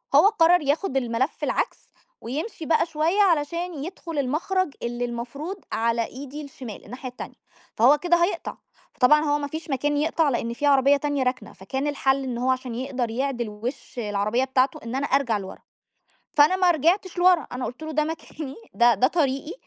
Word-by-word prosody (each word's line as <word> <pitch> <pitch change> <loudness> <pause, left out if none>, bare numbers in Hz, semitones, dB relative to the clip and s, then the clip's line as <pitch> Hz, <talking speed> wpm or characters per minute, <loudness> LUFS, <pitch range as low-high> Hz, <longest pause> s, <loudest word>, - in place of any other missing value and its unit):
هو 325 +8 +8
قرّر 355 -4 +4
ياخد 285 +1 0
الملّف 245 +2 -1
العكس، - - -2 0.3
ويمشي 310 - -5
بقى 315 +1 +3
شوية 330 +5 +1
علشان 340 -2 0
يدخُل 335 -2 -5
المَخرَج 310 +5 0
اللي 240 +1 -2
المفروض 250 +10 -5
على 230 0 +1
إيدي 280 +4 -8
الشمال، 260 -6 -9
الناحية 255 +3 -7
التانية، 245 - -9 0.4
فهو 255 +7 +6
كده 345 +2 +2
هيقطَع، 365 - -2 0.4
فطبعًا 285 +4 +5
هو 295 -1 +1
ما 285 - -3
فيش 315 +2 -7
مكان 290 +2 0
يقطَع 315 0 +2
لأن 235 -2 -1
في 290 - -3
عربية 280 0 +5
تانية 285 -1 -1
راكنة، 255 +1 -3
فكان 265 +9 -4
الحلّ 275 -1 +1
إن 250 -2 -3
هو 255 +2 0
عشان 255 -2 -3
يقدَر 255 -1 -2
يعدِل 240 -2 -2
وِشّ 235 +8 -7
العربية 210 +3 0
بتاعته، 265 +4 +1
إن 230 +2 -5
أنا 275 +1 -1
أرجَع 255 -5 +2
لورا 190 -1 -8 0.8
فأنا 300 +5 +6
ما 365 -1 +4
رجعتش 345 +4 +1
لورا، 360 -2 +4
أنا 250 0 -3
قُلت 250 +6 -8
له 315 - -5
ده 305 0 +1
مكاني 310 -3 -6 0.2
ده 240 0 +5
ده 235 +5 +3
طريقي 290 -1 0
280 Hz, 175 wpm, -24 LUFS, 250-315 Hz, 0.8 s, هو